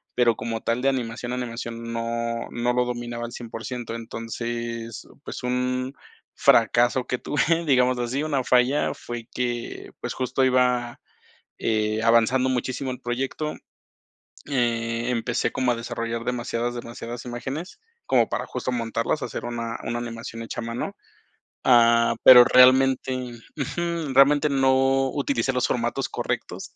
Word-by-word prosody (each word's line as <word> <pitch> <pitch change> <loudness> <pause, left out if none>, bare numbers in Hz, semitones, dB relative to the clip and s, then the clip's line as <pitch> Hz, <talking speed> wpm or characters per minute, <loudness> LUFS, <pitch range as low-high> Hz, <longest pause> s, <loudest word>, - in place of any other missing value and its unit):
pero 120 -2 +3
como 115 -1 -4
tal 115 +2 -1
de 135 - +3
animación, 125 -2 -3
animación 115 -1 -5
no 115 0 -2
no 120 +1 0
lo 125 0 +2
dominaba 120 -1 -4
al 120 - -8
100%, 115 0 -6
entonces, 115 0 -5 0.2
pues, - - -7
un 125 +1 -1 0.4
fracaso 120 +2 +4
que 125 - -1
tuve, 165 +4 +1
digamos 125 -2 +3
así, 125 +4 -1
una 145 -4 0
falla 125 +3 +2
fue 120 -1 -7
que, 120 -1 -4
pues - - -3
justo 130 +1 0
iba, 125 -2 +1 0.6
eh, 110 0 0
avanzando 115 +3 +4
muchísimo 130 +1 -2
el 125 0 -7
proyecto, 135 +5 -3 0.9
eh, 120 -2 0
empecé 120 0 -1
como 130 -1 +1
a - - -3
desarrollar 115 0 -4
demasiadas, 120 -1 -2
demasiadas 120 0 -7
imágenes 130 - -6 0.3
como - - +3
para - - -2
justo - - -3
montarlas, 115 +3 -1
hacer - - -5
una 115 -1 -4
una 120 - -2
animación 115 -1 -6
hecha 115 - -5
a - - -5
mano. 115 +1 -4 0.7
Ah, 115 -1 +5
pero 125 -1 +11
realmente 130 +1 +5 0.4
Ujú. 165 +1 -2
Realmente 145 +2 +5
no 135 0 +3
utilicé 135 -2 0
los 125 0 +1
formatos 120 +3 -1
correctos - - -4
120 Hz, 135 wpm, -24 LUFS, 115-130 Hz, 0.9 s, pero